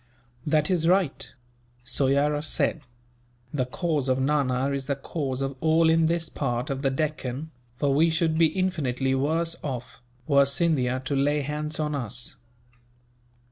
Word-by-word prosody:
"That 150 +2 +2
is 165 -3 +2
right," 185 -4 +1 0.5
Soyera 140 +3 +1
said. 155 0 0 0.7
"The 130 -4 0
cause 150 -1 -1
of 130 0 +2
Nana 135 -1 +1
is 140 -1 -3
the 140 - 0
cause 135 -2 -3
of 135 0 -3
all 160 +1 +4
in 165 0 +4
this 165 0 0
part 125 -1 -2
of 135 0 -3
the 135 - +2
Deccan; 145 0 -3 0.3
for 140 +1 +1
we 160 +4 +4
should 160 -1 +1
be 165 0 +5
infinitely 150 -8 -1
worse 160 +5 0
off, 125 -5 -6 0.2
were 140 -1 +5
Scindia 135 -4 +1
to 140 - -1
lay 145 +2 +2
hands 150 +2 -4
on 150 -1 -1
us. 125 -3 -5
145 Hz, 150 wpm, -26 LUFS, 135-160 Hz, 0.7 s, be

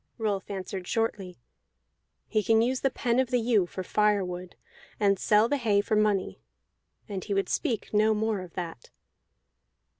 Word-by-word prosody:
Rolf 205 -4 -2
answered 190 -2 -5
shortly: 205 -5 -2 0.9
"He 215 - 0
can 225 +2 +3
use 255 +2 0
the 270 - +2
pen 240 -1 0
of 260 -2 +1
the 250 - +2
ewe 220 -6 +2
for 185 - -6
firewood, 185 -4 0 0.4
and 200 -2 +3
sell 215 +1 +4
the 285 - 0
hay 215 -6 +2
for 210 +1 0
money." 210 -3 +1 0.7
And 195 -4 -5
he 205 - -2
would 195 - 0
speak 240 -10 -2
no 215 +1 +4
more 215 -2 -1
of 180 -2 -11
that. 165 -9 -6
210 Hz, 160 wpm, -28 LUFS, 190-225 Hz, 0.9 s, sell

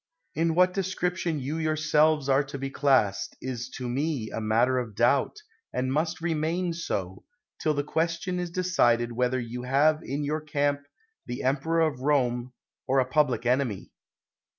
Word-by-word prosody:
In 165 0 +1
what 180 +1 +4
description 180 -3 -1
you 140 +4 -3
yourselves 155 -2 +2
are 135 +1 +3
to 140 +1 -7
be 135 0 -4
classed, 135 -9 +2
is 125 -2 -5
to 125 - -4
me 135 -2 -2
a 110 - -4
matter 115 +4 +2
of 115 -4 -6
doubt, 125 - +2 0.3
and 130 +1 -1
must 160 +3 -1
remain 165 +2 -1
so, 95 - -4 0.4
till 155 -1 +1
the 145 - 0
question 170 +4 -1
is 175 -1 -3
decided 120 -10 +2
whether 125 +2 0
you 120 +1 -5
have 145 +5 +3
in 140 +2 -3
your 150 +2 -1
camp 145 -1 0 0.5
the 125 - -4
emperor 145 +5 +1
of 155 -5 +1
Rome, 125 -3 +1 0.4
or 135 +1 +2
a 130 - +3
public 130 -2 +1
enemy. 125 -6 0
140 Hz, 160 wpm, -27 LUFS, 125-160 Hz, 0.5 s, what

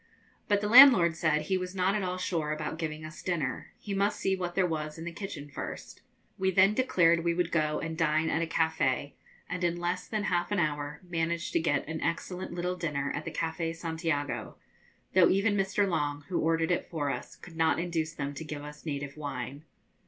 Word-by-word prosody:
But 205 -1 +2
the 210 - -1
landlord 225 -9 +9
said 155 -2 +1
he 185 +4 0
was 180 +1 -5
not 185 +1 +2
at 210 - 0
all 180 -1 -2
sure 165 -4 -1
about 155 +1 -4
giving 155 -1 -4
us 155 0 -9
dinner; 165 -8 -2
he 205 - -6
must 200 +2 +1
see 190 - +1
what 175 -2 -4
there 190 - +3
was 155 -2 -3
in 165 - -7
the 170 - -4
kitchen 170 -5 -6
first. 145 - -7 0.4
We 190 0 +2
then 190 +2 +5
declared 170 -9 +3
we 170 -1 +1
would 175 -1 0
go 155 -2 +1
and 165 -1 -4
dine 160 -1 +2
at 160 - +1
a 165 - 0
cafe, 160 -4 0 0.3
and 180 0 -4
in 175 0 +1
less 175 +1 -2
than 215 -2 -2
half 175 0 0
an 205 - +1
hour 150 -3 -1
managed 170 0 -2
to - - +3
get 145 -4 0
an 160 0 -4
excellent 180 +2 -3
little 180 +1 -2
dinner 145 -5 -2
at - - -4
the - - -4
Cafe 165 0 -2
Santiago, 160 -3 -3 0.6
though 185 -2 +6
even 205 +2 +2
Mr. 200 +1 +1
Long, 145 -5 -1
who 180 - 0
ordered 165 +1 +1
it 175 - -1
for 145 -4 -1
us, - - -6
could 165 - -13
not 160 -2 +2
induce 165 -2 -2
them 140 -1 -3
to 150 - -6
give 150 -2 -6
us 150 +2 -10
native 140 -1 -4
wine. 140 0 -5
165 Hz, 210 wpm, -29 LUFS, 155-180 Hz, 0.6 s, landlord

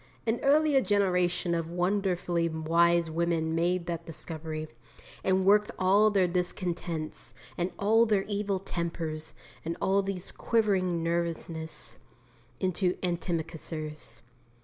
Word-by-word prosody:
An 225 +1 +1
earlier 290 0 +4
generation 180 -5 +1
of 165 -1 -1
wonderfully 180 -2 0
wise 165 +1 +2
women 165 -1 0
made 175 +1 +1
that 170 -1 -3
discovery, 155 -1 -5 0.6
and 190 0 +2
worked 210 +1 +5
all 200 +3 +5
their 195 -3 +3
discontents, 175 -2 -3 0.2
and 175 +1 -1
all 225 +3 +4
their 205 -3 +2
evil 205 -1 -1
tempers, 165 -4 -4 0.3
and 165 +1 -3
all 195 +1 +2
their 195 -1 -3 0.2
quivering 190 -7 +1
nervousness 165 -1 -3 0.6
into 185 0 0
antimacassars. 160 -6 -4
175 Hz, 110 wpm, -29 LUFS, 165-195 Hz, 0.6 s, worked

